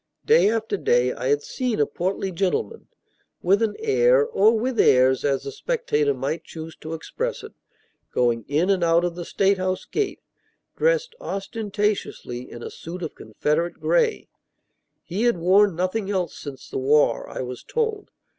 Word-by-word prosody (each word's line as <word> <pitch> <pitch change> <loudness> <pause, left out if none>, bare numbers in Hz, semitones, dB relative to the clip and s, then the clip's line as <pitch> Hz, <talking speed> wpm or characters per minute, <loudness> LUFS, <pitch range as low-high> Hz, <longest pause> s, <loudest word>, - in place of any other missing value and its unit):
Day 455 - +5
after 220 -2 -1
day 125 -6 +2
I - - -4
had 145 +1 +2
seen 250 -4 -2
a 145 - +4
portly 190 +4 -2
gentleman 190 - -2 0.6
with 195 +4 +3
an 220 -2 0
air, 470 +2 +3
or 225 - +3
with 245 +2 -2
airs, 130 +1 +5
as 140 -2 +1
the - - -5
spectator 150 - 0
might 135 +6 -3
choose 160 0 -9
to 160 +1 -6
express - - -4
it - - -10 0.6
going 120 -2 +1
in 160 +7 +2
and 185 -3 +1
out 170 +1 +4
of 175 - -2
the 175 0 -6
State 195 +1 +2
House 185 0 -2
gate, 415 -2 -2 0.6
dressed - - +1
ostentatiously 205 - -3
in 120 - -9
a - - -6
suit 175 +2 -8
of 160 - -4
Confederate 150 +10 -2
gray. 475 -3 +1 0.8
He 195 +7 -2
had 240 -6 +3
worn 190 +2 +4
nothing 185 +4 -1
else 185 -4 -1
since 140 -3 -9
the - - -4
war, 135 -3 +2
I - - -5
was 125 0 -7
told. 445 -3 -2
185 Hz, 165 wpm, -24 LUFS, 150-230 Hz, 0.8 s, Day